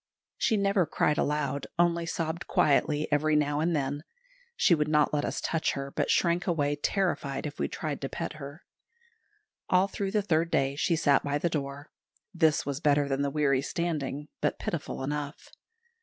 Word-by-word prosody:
She 220 - +1
never 195 -3 +2
cried 150 0 +1
aloud, 145 -2 -1
only 170 -1 +2
sobbed 165 0 -3
quietly 150 +1 +2
every 155 +1 +2
now 145 -1 +1
and 165 +2 +1
then. 145 +1 -2 0.5
She 185 - +4
would 150 -2 +2
not 150 -1 +3
let 145 -1 +1
us - - -2
touch 165 -1 0
her, 140 0 -5
but - - -1
shrank 175 0 +2
away 145 -4 +1
terrified 145 -4 -1
if 145 -1 -6
we - - +1
tried 150 -3 -4
to 135 - -3
pet - - -4
her. 145 +1 -9 1.1
All 185 +1 +4
through 200 -1 -3
the 210 +1 +1
third 165 -3 +1
day 135 -4 +1
she 165 +3 +1
sat 145 -3 +3
by 145 0 0
the 170 +4 0
door. 145 -1 -4 0.4
This 160 -4 +2
was 140 -1 -3
better 145 -2 +3
than 135 0 -1
the 140 - +1
weary 140 -2 +2
standing, 150 -2 -3
but - - 0
pitiful - - -4
enough. 145 +1 -4
150 Hz, 180 wpm, -28 LUFS, 145-170 Hz, 1.1 s, She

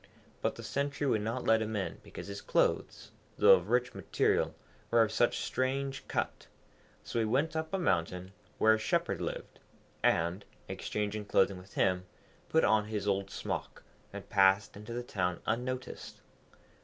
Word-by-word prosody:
But - - 0
the - - -9
sentry 140 +1 -2
would 110 -6 +2
not 115 +4 -2
let 110 0 +4
him 110 0 -2
in 100 -2 -3
because - - -9
his 100 0 -6
clothes, - - 0 0.3
though - - +7
of 95 +1 +2
rich 125 +1 +2
material, - - +1 0.3
were 115 -1 +5
of 110 - -1
such 120 +2 +2
strange 135 +1 -2
cut. - - -2 0.6
So 115 - -2
he 115 - +2
went 135 +9 +1
up 160 0 -2
a 195 - 0
mountain, 90 - 0 0.3
where 110 0 +5
a 110 - +1
Shepherd 110 - 0
lived, - - -5 0.4
and, 85 +4 +2 0.2
exchanging 105 0 -3
clothing 95 -1 +2
with 95 +2 -16
him, 90 -1 +2 0.4
put 160 - +3
on 110 -1 +4
his 105 -1 -3
old 100 -1 0
smock, - - -5 0.3
and - - -8
passed 95 +1 +4
into 105 +3 -9
the 120 +1 -3
town 90 -6 -1
unnoticed. 125 +3 -3
110 Hz, 165 wpm, -32 LUFS, 100-125 Hz, 0.6 s, though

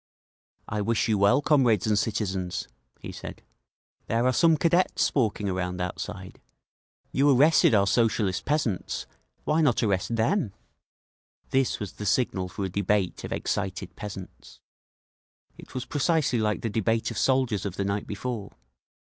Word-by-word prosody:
"I 105 0 -2
wish 115 +2 +1
you 110 -3 +1
well, 100 +8 +4
comrades 125 - +3
and 110 -1 +2
citizens," 95 -4 -2 0.3
he - - -7
said. - - -9 0.6
"There 115 +2 +1
are 130 - +3
some 165 +3 +4
Cadets 170 +4 +2
walking 110 -6 0
around 90 -1 -2
outside. 95 +1 -6 0.7
You 140 +2 +3
arrested 140 -2 +5
our 100 -1 +4
Socialist 100 -3 +1
peasants—why 150 - -2
not 135 -7 +2
arrest 100 +2 0
them?" 115 - +1 1.0
This 135 -1 +1
was 105 -3 -5
the 105 - -5
signal 95 -6 0
for 95 +2 -4
a - - -3
debate 100 0 0
of - - -6
excited 95 -2 -3
peasants. 95 -3 -9 1.0
It - - -14
was 130 0 -3
precisely 145 -4 +1
like 105 -1 0
the 115 - -2
debate 115 +2 0
of 115 - -6
soldiers 130 -6 +1
of 100 -3 -4
the 100 - -2
night 100 +1 -2
before. 105 0 -5
105 Hz, 145 wpm, -26 LUFS, 100-130 Hz, 1.0 s, arrested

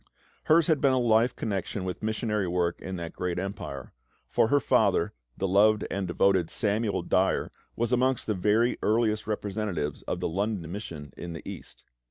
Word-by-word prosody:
Hers 160 +1 +5
had 155 -4 +2
been 135 -2 +4
a - - +3
life 120 0 +3
connection 100 -2 -3
with 90 -1 -4
missionary 110 -2 -1
work 85 -1 0
in 95 - -5
that 85 -2 -6
great 90 -1 -3
empire; 90 - -5 0.3
for - - +2
her 145 +5 +4
father, - - +2 0.2
the 95 - 0
loved 105 +3 +4
and 100 -1 -2
devoted 90 -1 +2
Samuel 105 0 0
Dyer, - - +1 0.2
was 120 +1 0
amongst 130 0 +2
the 110 - 0
very 105 +5 +2
earliest 110 -1 +1
representatives 100 -7 -2
of - - -2
the - - -1
London 95 -1 -2
Mission 80 -8 -7
in 85 -1 -6
the 80 - -9
East. - - -9
105 Hz, 175 wpm, -28 LUFS, 90-110 Hz, 0.3 s, Hers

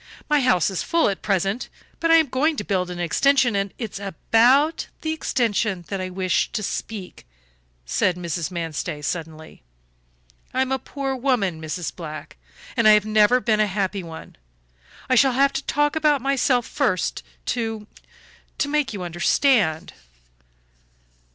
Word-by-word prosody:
"My 300 -1 +3
house 190 -8 +2
is 190 - -2
full 335 -7 +2
at 195 - -4
present, 195 +4 -1 0.3
but 330 - 0
I 330 - +7
am 325 -1 +5
going 290 +4 0
to 210 - -4
build 185 -3 -1
an 180 - -6
extension, 255 +7 +2
and 200 -1 -1
" - - -39
"It 225 -5 -5
is - - -7
about 240 - +2
the 315 0 -1
extension 215 - -1
that 195 -2 -3
I 185 - -4
wish 185 0 0
to 215 - -2
speak," 195 - -6 0.6
said 115 - +1
Mrs. 170 -2 -3
Manstey, 165 -3 -4
suddenly. 160 0 -6 0.9
"I 260 - +3
am 265 - -5
a 265 - 0
poor 270 -1 -4
woman, 235 - 0
Mrs. 160 +2 -4
Black, 155 - -8 0.4
and 230 - +3
I 215 - +9
have 210 -1 +4
never 215 +3 +4
been 220 -3 +1
a 215 - +3
happy 195 0 -2
one. 165 -2 -10 0.7
I 260 - +1
shall 260 +1 +5
have 275 +2 +3
to - - -3
talk 295 +1 +1
about 300 -2 +3
myself 260 -2 +1
first 215 - -1 0.3
to 225 -3 -3 0.7
to 285 - 0
make 285 -4 0
you 195 -3 -5
understand." 175 - +1
215 Hz, 165 wpm, -23 LUFS, 180-265 Hz, 0.9 s, I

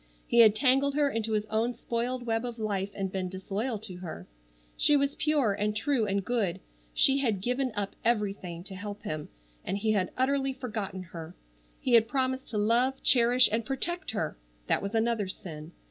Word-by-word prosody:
He 235 - +2
had 220 -2 +8
tangled 270 +3 +3
her 290 -1 +2
into 225 -2 -2
his 210 0 0
own 230 +3 0
spoiled 240 +2 -2
web 225 0 0
of 240 -1 -5
life, 200 -3 -2
and 195 -1 -3
been 185 -1 -2
disloyal 200 +6 -3
to 190 -5 -7
her. 160 - -7 0.5
She 295 - +4
was 280 0 +1
pure 290 -9 +2
and 210 +1 -1
true 235 -1 +1
and 195 -1 -1
good. 220 -7 0 0.3
She 270 - +4
had 225 -8 +1
given 250 +5 -1
up 200 -1 -3
every 210 -4 +2
thing 175 -3 -8
to 195 - -7
help 205 +2 -7
him 155 -1 -4 0.3
and 195 - -2
he 215 +2 +1
had 190 -4 +1
utterly 270 +1 +1
forgotten 215 -7 -5
her. 170 -1 -9 0.4
He 255 - -1
had 225 -1 +6
promised 260 +1 -1
to 215 - -4
love, 240 +5 +2
cherish, 245 0 +6
and 225 +2 0
protect 340 +8 -2
her! 220 - -2 0.3
That - - +1
was 200 +3 -4
another 225 -2 +1
sin. 160 -4 -8
225 Hz, 190 wpm, -29 LUFS, 195-255 Hz, 0.5 s, had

